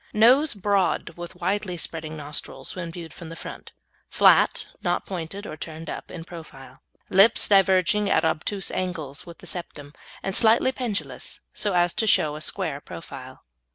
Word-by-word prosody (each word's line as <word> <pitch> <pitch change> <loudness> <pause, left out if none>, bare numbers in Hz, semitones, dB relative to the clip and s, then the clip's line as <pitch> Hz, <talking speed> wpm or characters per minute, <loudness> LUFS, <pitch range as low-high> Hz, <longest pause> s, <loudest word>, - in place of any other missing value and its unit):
Nose 255 +6 +6
broad, 195 -4 +1
with 175 +2 -9
widely 185 0 -1
spreading 160 -1 -5
nostrils 150 0 -6
when 170 -2 -5
viewed 165 -1 -8
from 165 - -9
the 165 - -7
front; - - -9 0.4
flat - - +5 0.2
(not - - 0
pointed 190 +2 -5
or 155 - -6
turned 160 +1 -7
up) - - -7
in 170 -2 -7
profile. 155 -6 -11 0.3
Lips 195 +4 +6
diverging 195 +1 +4
at - - +3
obtuse 190 +5 -1
angles 165 -5 -4
with 170 - -10
the - - -14
septum, 150 -4 -7 0.3
and 195 - -2
slightly 230 +3 +4
pendulous 240 -6 -4
so 205 -3 -1
as 175 -1 +3
to 220 - +1
show 150 -6 +4
a 155 - -7
square 160 -4 -1
profile. 130 -6 -10
175 Hz, 160 wpm, -25 LUFS, 160-200 Hz, 0.4 s, Nose